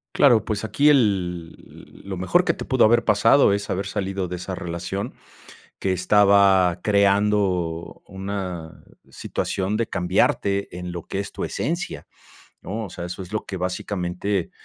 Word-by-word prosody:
Claro, 120 -6 +5
pues 110 -1 -3
aquí 140 +8 +3
el 90 - -1
lo 95 -2 -4
mejor 175 - +2
que - - +2
te - - -7
pudo 130 -4 +3
haber 120 +1 +4
pasado 105 +4 +4
es 100 0 -2
haber 95 +1 -2
salido 95 -1 -3
de 90 - -5
esa 90 +2 -6
relación, 90 +6 -5 0.6
que 95 - 0
estaba 95 -1 +4
creando 100 -4 +1
una 95 -4 -6 0.3
situación 95 +2 -3
de 115 0 0
cambiarte 95 +1 0
en 90 0 -6
lo 85 -1 -6
que 95 - -4
es 100 - -5
tu - - -5
esencia, 170 +3 -3 0.5
¿no? 110 +2 -4
O - - -10
sea, 85 - -7
eso 90 +2 -6
es 90 - -11
lo 110 - -3
que 95 - -6
básicamente, 90 0 -2
100 Hz, 155 wpm, -23 LUFS, 90-105 Hz, 0.6 s, Claro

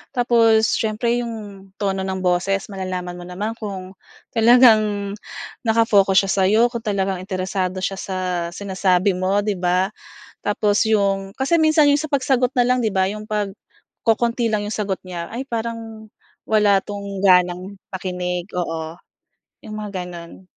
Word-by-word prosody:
Tapos 230 -3 +4
siyempre 230 +2 0
'yong 210 -5 -7
tono 195 -2 -1
ng 190 0 -3
boses, 190 +3 0
malalaman 185 -2 -5
mo 175 - -9
naman 210 +6 -4
kung 190 -3 -6 0.4
talagang 220 -4 +4 0.5
naka-focus 205 -4 +4
siya 195 - -1
sa 190 +1 +2
'yo, 225 +4 +4
kung 235 - -3
talagang 195 -4 -1
interesado 185 0 -3
siya 195 0 -2
sa 180 -2 -2
sinasabi 190 -1 +1
mo 190 +3 0
'di 205 -3 -2
ba? 180 +2 +1 0.5
Tapos 205 0 +1
'yong 195 -2 0
kasi 270 +6 +1
minsan 310 -2 +4
'yong 285 +1 +3
sa 310 - -6
pagsagot 260 -3 +2
na 245 - +4
lang 250 0 +2
'di 220 - +1
ba 190 -1 +1
'yong 215 +2 -6
pag 205 -2 -1 0.5
kokonti 230 +1 +1
lang 210 -1 -1
'yong 210 - -3
sagot 200 -3 -2
niya, 170 -2 -6
"Ay 250 +4 -5
parang 225 -2 -5 0.4
wala 210 -2 +4
itong 200 -1 -6
ganang 180 +1 +3 0.2
makinig." 180 -1 -3
Oo, 165 -2 -3 0.7
'yong 215 - -7
mga 205 -1 -6
ganun. 175 +1 -10
200 Hz, 150 wpm, -21 LUFS, 185-225 Hz, 0.7 s, Tapos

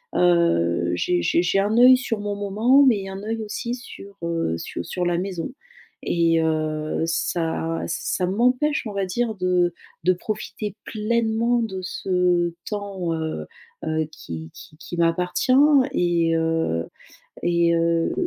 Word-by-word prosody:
heu 90 - +3
j'ai 90 0 0
j'ai 170 - +2
j'ai 195 +2 +2
un 205 +2 +1
œil 255 +1 +8
sur 230 -4 -3
mon 205 0 -3
moment 215 +8 +3
mais 200 -5 +2
un 190 +1 -7
œil 225 +1 -3
aussi 235 +3 -4
sur, 200 -5 -11
heu, 165 - -1
su 85 - -5
sur 180 - -3
la 175 -1 +1
maison. 180 -1 -3 0.5
Et 165 -1 +2
heu, 155 -1 -1
ça 165 0 -1
ça 180 +2 -1
m'empêche 250 +9 +1
on 205 - -6
va 195 -1 -1
dire 220 +3 -1
de 180 -2 +1 0.3
de 185 - +5
profiter 210 +1 -5
pleinement 230 +2 0
de 190 -4 -3
ce 180 -2 0 0.2
temps, 200 -5 -3
heu 160 -1 -4 0.4
heu, 155 -1 -1
qui 80 -1 -8
qui 155 - -14
qui 175 0 -8
m'appartient 180 +7 +1 0.4
et 170 -2 +2
heu 160 - 0 0.6
et 170 -1 +3
heu 165 0 +1
180 Hz, 145 wpm, -23 LUFS, 165-210 Hz, 0.6 s, œil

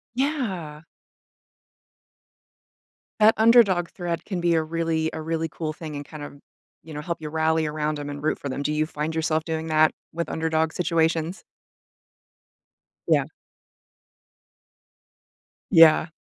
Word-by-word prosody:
Yeah. 200 - -2 2.4
That 215 +1 +6
underdog 220 -6 +5
thread 175 -2 -4
can 185 -4 -4
be 170 -1 +2
a 160 - +2
really 160 0 -1
a 160 - -5
really 165 +1 -2
cool 155 0 -4
thing 155 -1 -8
and 145 - -6
kind 155 0 -10
of, 145 0 -9 0.5
you 160 -1 -10
know, 150 - -4
help 170 +3 -4
you 155 - -5
rally 160 0 +1
around 150 0 -2
'em 145 0 -5
and 145 0 -7
root 155 - 0
for 140 - -6
them. 140 +1 -4
Do 150 - -1
you 155 0 0
find 155 0 -4
yourself 160 -1 0
doing 160 -1 -3
that 155 0 +4 0.2
with 170 +1 -3
underdog 160 0 0
situations? 165 +1 0 1.7
Yeah. - - +4 2.5
Yeah. 165 -2 +7
160 Hz, 135 wpm, -24 LUFS, 155-170 Hz, 2.5 s, Yeah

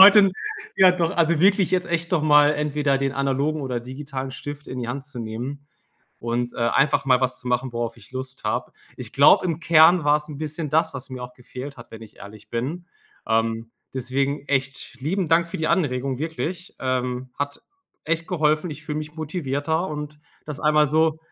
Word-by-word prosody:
heute 200 0 +9 0.5
ja 190 -1 +8
doch, 170 -2 0
also, 170 -2 +3
wirklich 190 -1 +4
jetzt 185 -1 +1
echt 170 +1 -2
doch 165 - +2
mal 150 -1 +6
entweder 150 -1 +1
den 135 0 0
analogen 140 +3 0
oder 125 -3 -2
digitalen 130 +1 -6
Stift 145 +2 -8
in 130 - -6
die 120 - -4
Hand 135 +2 -4
zu 140 -3 -10
nehmen 120 +6 -5 0.5
und, 120 +1 -2
äh, - - -9
einfach 135 +5 +2
mal 130 -2 +4
was 130 -1 -1
zu 125 - -6
machen, 125 +1 0
worauf 120 0 -3
ich 115 +2 -17
Lust 130 +1 -6
habe. - - -2 0.2
Ich - - -8
glaube, - - +6
im 165 -2 -2
Kern 165 0 +6
war's 150 0 +2
'n 145 -2 -8
bisschen 155 +1 -4
das, 160 0 +2
was 135 -1 -7
mir 130 -1 -6
auch 125 0 -8
gefehlt 130 +3 -9
hat, 120 -1 -13
wenn 110 0 -10
ich 110 -1 -14
ehrlich 105 +1 -12
bin, 150 +10 -3 0.4
ähm, 115 0 0 0.2
deswegen 135 +3 -1
echt 135 -1 -2
lieben 175 +5 -1
Dank 165 +1 +3
für - - -5
die 160 0 0
Anregung, 135 -6 0
wirklich, 165 +4 -4
ähm, 125 0 -2
hat 145 0 -3 0.4
echt 165 +1 -1
geholfen. 155 -1 +1
Ich 155 +1 -9
fühle 150 -1 -3
mich 150 0 -7
motivierter 160 +1 -2
und 150 0 -6 0.3
das 150 -2 -6
einmal 150 -1 +4
so, 160 +1 +2
145 Hz, 195 wpm, -23 LUFS, 130-160 Hz, 0.5 s, heute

